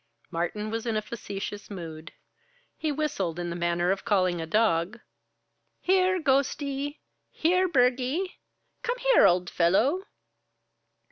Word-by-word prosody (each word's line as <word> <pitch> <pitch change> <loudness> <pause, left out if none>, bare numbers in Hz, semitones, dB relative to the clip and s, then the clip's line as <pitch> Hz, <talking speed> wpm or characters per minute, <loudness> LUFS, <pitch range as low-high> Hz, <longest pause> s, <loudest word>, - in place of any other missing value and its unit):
Martin 210 +6 -2
was 225 +1 -3
in 220 -2 0
a - - 0
facetious 205 -2 -6
mood. 165 -5 -8 0.6
He 310 - -2
whistled 265 - -2
in 175 -1 -3
the - - -4
manner 175 +1 +1
of 195 - -2
calling 185 -6 +1
a 160 - -5
dog. 210 +1 +1 0.8
"Here, 370 0 +3
Ghostie! 280 0 0 0.3
Here, 365 +3 +2
Burgie! 265 +5 +1 0.4
Come 485 +1 -2
here, - - +5
old 175 0 +2
fellow!" 235 - +2
225 Hz, 125 wpm, -27 LUFS, -, 0.8 s, here